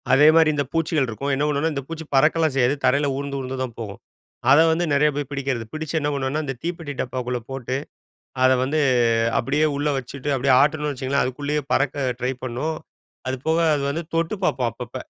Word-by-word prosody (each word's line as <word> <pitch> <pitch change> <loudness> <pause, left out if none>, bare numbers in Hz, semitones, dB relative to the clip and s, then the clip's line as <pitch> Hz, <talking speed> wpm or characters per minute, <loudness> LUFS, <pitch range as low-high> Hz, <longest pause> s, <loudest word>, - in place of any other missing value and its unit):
அதே 145 +3 +6
மாரி 160 -1 +6
இந்த 145 - +1
பூச்சிகள் 165 -3 +1
இருக்கும். 135 +5 -3
என்ன 135 +2 0
பண்ணுவோம்னா, 150 +2 0
இந்த 140 -1 -4
பூச்சி 165 -1 -6
பறக்கலாம் 155 +2 +3
செய்யாது. 130 +1 +3
தரையில 145 +2 +3
ஊர்ந்து 140 0 -4
ஊர்ந்துதான் 130 -2 -4
போகும். 105 -4 -6 0.5
அத 140 - +7
வந்து 165 +2 +1
நெறைய 150 +2 +4
பேரு 145 -2 -3
பிடிக்கிறது. 135 -4 -2
பிடிச்சு 155 0 -4
என்ன 145 -1 -1
பண்ணுவோம்னா, 140 +2 -1
அந்த 135 -2 -4
தீப்பெட்டி 165 -3 -4
டப்பாக்குள்ள 125 -1 -3
போட்டு, 130 -1 -4 0.7
அத 130 - +6
வந்து 145 +4 0 0.6
அப்டியே 145 +5 +1
உள்ளே 145 +1 0
வச்சுட்டு 135 +2 -5
அப்டியே 130 0 +3
ஆட்னம்னு 150 0 +1
வச்சுக்கோங்களேன். 135 +1 0
அதுக்குள்ளேயே 145 +3 -2
பறக்க 135 0 +1
ட்ரை 125 +2 0
பண்ணும். 130 +6 -3 0.5
அது 130 - -1
போக 160 +1 +2 0.2
அது 145 - -1
வந்து 165 +4 -3
தொட்டு 165 +3 0
பார்ப்போம் 125 -8 +1
அப்பப்ப. 120 +2 -9
140 Hz, 185 wpm, -23 LUFS, 130-150 Hz, 0.7 s, அத